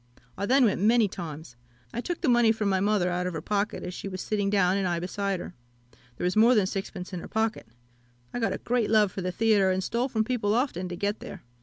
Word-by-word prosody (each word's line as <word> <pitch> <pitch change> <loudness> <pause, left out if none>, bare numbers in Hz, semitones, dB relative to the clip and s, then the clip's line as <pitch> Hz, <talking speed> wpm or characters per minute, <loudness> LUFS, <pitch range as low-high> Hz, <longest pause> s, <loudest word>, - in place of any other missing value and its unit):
I 200 - -3
then 260 +1 +5
went 200 -4 +1
many 225 +1 +4
times. 160 -8 -8 0.4
I - - -2
took 350 +5 -4
the 330 - 0
money 240 -2 +5
from 215 -2 -1
my 190 -1 +2
mother 200 -2 +1
out 180 +1 -1
of 180 - -4
her 155 - -4
pocket 205 +2 -1
as 180 - -5
she 195 - -6
was 185 -1 -5
sitting 205 +1 -1
down, 195 -2 +3
and 195 -2 0
I 175 -1 0
beside 195 +2 -2
her. - - -8 0.6
There - - -2
was 180 - 0
more 230 +4 +6
than 210 -4 +4
sixpence 190 -1 -5
in 180 - -3
her - - -8
pocket. 220 - -1 0.7
I - - -2
got 225 - 0
a - - -2
great 240 -3 0
love 210 -3 +4
for 190 - -5
the 180 0 -2
theatre, 205 -1 +3
and 185 0 0
stole 235 +7 -1
from 220 -3 +1
people 220 -3 0
often 210 -8 -1
to 175 - -4
get 205 +4 -2
there. 190 - -9
200 Hz, 255 wpm, -27 LUFS, 180-225 Hz, 0.7 s, more